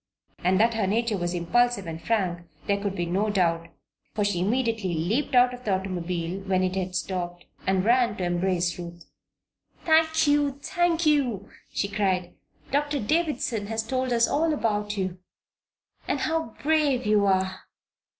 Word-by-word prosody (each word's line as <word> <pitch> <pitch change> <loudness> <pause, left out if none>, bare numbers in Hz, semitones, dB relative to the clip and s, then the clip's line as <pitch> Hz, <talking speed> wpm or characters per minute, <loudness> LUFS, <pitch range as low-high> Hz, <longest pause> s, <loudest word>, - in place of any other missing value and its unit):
And 185 +2 +2
that 230 +2 +4
her 220 -4 0
nature 225 +2 +1
was 175 -1 -2
impulsive 215 +4 +1
and 165 0 -6
frank 180 -6 -1 0.2
there 200 0 0
could 200 -1 -2
be 175 - -1
no 195 +5 0
doubt, 170 -4 +1 0.5
for 210 - +1
she 200 -4 0
immediately 220 -2 0
leaped 225 - 0
out 250 0 +5
of 250 0 -9
the 200 -4 +1
automobile, 180 -1 -3
when 185 -1 +1
it 185 0 -1
had 185 -1 -3
stopped, 175 -1 -3 0.2
and 190 0 +2
ran 240 -1 +3
to 185 - -3
embrace 175 0 0
Ruth. 170 0 -9 0.8
"Thank 320 0 +4
you! 290 -1 +3
thank 345 -2 +1
you!" 255 -10 +1 0.2
she 200 - -1
cried. 190 -3 -1 0.4
"Doctor 290 +1 0
Davison 255 -5 0
has 220 0 -2
told 255 +2 -2
us 235 -1 +4
all 320 +2 +1
about 210 -4 -1
you 185 -2 -2 0.9
and 280 - -1
how 320 -7 -1
brave 290 -5 +2
you 210 -1 +3
are! 190 0 0
205 Hz, 160 wpm, -26 LUFS, 185-250 Hz, 0.9 s, out